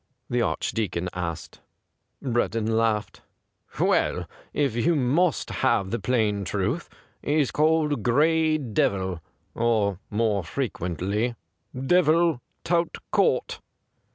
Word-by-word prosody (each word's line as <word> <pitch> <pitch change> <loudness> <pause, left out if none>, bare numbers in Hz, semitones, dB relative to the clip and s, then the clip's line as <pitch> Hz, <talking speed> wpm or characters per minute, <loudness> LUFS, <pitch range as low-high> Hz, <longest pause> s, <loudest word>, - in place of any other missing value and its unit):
''' 125 - -50
the 120 0 +2
Archdeacon 90 0 -1
asked. 85 -3 -5 0.6
Breddon 115 -3 0
laughed. 110 -2 0 0.3
' - - -19
Well, - - +1 0.2
if 140 -6 0
you 160 +8 +2
must 150 +6 +1
have 115 -7 +2
the 120 - -1
plain 110 -5 +1
truth, 105 - -2 0.3
he's 145 -2 +1
called 155 -3 +2
Gray 155 +6 +3
Devil 95 - -1 0.2
— - - -44
or, 110 -5 +1
more 105 -3 +1
frequently. 100 - -2 0.4
Devil 165 0 +3 0.2
tout 170 -1 0
court.' - - +1
120 Hz, 110 wpm, -25 LUFS, 100-150 Hz, 0.6 s, Gray